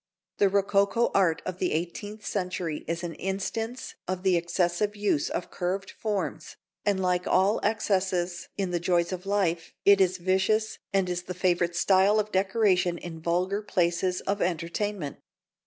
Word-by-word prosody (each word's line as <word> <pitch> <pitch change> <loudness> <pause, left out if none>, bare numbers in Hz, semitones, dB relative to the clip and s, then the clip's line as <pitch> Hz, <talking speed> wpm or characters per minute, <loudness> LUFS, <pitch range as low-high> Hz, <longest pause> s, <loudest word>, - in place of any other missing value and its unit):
The 200 - +5
rococo 200 +3 +2
art 175 -5 +2
of 185 0 -4
the 180 - 0
eighteenth 205 +6 -4
century 180 -5 -2
is 170 +2 -2
an 170 -1 -4
instance 200 +7 -4
of 185 0 -3
the 190 -2 +4
excessive 175 +4 0
use 205 -8 +1
of 175 - -4
curved 190 +2 -2
forms, 210 -3 -3 0.3
and, 200 -2 +1
like 180 -1 0
all 195 +3 +3
excesses 185 -4 0
in 195 -3 -1
the 175 - 0
joys 170 0 +1
of 185 +1 -5
life, 175 -5 0
it 200 -1 +7
is 185 -1 +3
vicious 190 +5 +1
and 195 -2 +2
is 180 0 -2
the 180 0 -7
favourite 175 -2 +1
style 195 +4 +4
of 210 0 -2
decoration 190 -2 +2
in 165 -1 -8
vulgar 180 +5 0
places 180 -2 0
of 200 +1 -2
entertainment. 175 0 -2
185 Hz, 155 wpm, -27 LUFS, 175-200 Hz, 0.3 s, it